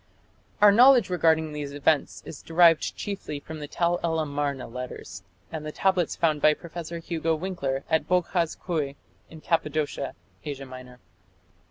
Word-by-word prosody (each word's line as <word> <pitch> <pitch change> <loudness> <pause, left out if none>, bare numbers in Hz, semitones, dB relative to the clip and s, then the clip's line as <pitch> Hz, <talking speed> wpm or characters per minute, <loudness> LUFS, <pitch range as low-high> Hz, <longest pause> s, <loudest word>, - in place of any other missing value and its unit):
Our 205 - +9
knowledge 245 -2 +6
regarding 160 -3 +2
these 145 -1 -5
events 145 +1 0
is 145 - -9
derived 165 -1 +4
chiefly 195 -7 -5
from 155 +2 -9
the 150 - -6
Tell 175 +3 0
el 165 -1 0
Amarna 145 -3 -2
letters, 115 -6 -7 0.3
and 160 -2 -5
the 155 - -5
tablets 185 -1 +1
found 155 -3 +1
by 155 0 +5
Professor 170 0 -7
Hugo 165 -1 -1
Winckler 140 -7 -3
at 160 0 +1
Boghaz 180 -2 0
Köi 150 -6 -3 0.3
in 160 -1 -12
Cappadocia, 150 -4 -1 0.3
Asia 140 -2 -6
Minor. 130 -1 -11
160 Hz, 150 wpm, -26 LUFS, 145-170 Hz, 0.3 s, Our